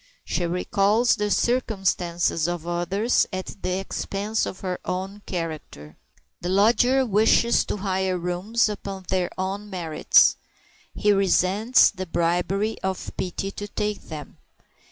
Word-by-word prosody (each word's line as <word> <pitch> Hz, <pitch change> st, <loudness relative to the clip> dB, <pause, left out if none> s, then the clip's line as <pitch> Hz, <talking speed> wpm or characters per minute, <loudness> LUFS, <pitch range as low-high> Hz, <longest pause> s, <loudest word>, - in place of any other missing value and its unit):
She 175 Hz, -, -1 dB
recalls 200 Hz, +6 st, +2 dB
the 210 Hz, -1 st, -1 dB
circumstances 190 Hz, -9 st, 0 dB
of 175 Hz, -2 st, -3 dB
others 175 Hz, +7 st, +1 dB
at 185 Hz, +1 st, -6 dB
the 185 Hz, 0 st, -1 dB
expense 200 Hz, +2 st, -2 dB
of 185 Hz, -, -7 dB
her 185 Hz, -2 st, -3 dB
own 190 Hz, +3 st, -4 dB
character. 155 Hz, -, -6 dB, 0.5 s
The 175 Hz, -, -3 dB
lodger 240 Hz, +7 st, +4 dB
wishes 225 Hz, +2 st, +3 dB
to -, -, -3 dB
hire 190 Hz, -1 st, -1 dB
rooms 180 Hz, +7 st, 0 dB
upon 195 Hz, -2 st, -6 dB
their 185 Hz, -1 st, +1 dB
own 195 Hz, +2 st, -3 dB
merits. 170 Hz, -5 st, +3 dB, 0.6 s
He 210 Hz, -, +2 dB
resents 195 Hz, +4 st, +4 dB
the 185 Hz, -2 st, -6 dB
bribery 180 Hz, +6 st, 0 dB
of 190 Hz, -1 st, -3 dB
pity 190 Hz, +2 st, -3 dB
to 205 Hz, +1 st, -6 dB
take 210 Hz, 0 st, -3 dB
them. 150 Hz, -3 st, -9 dB
190 Hz, 130 wpm, -24 LUFS, 180-210 Hz, 0.6 s, lodger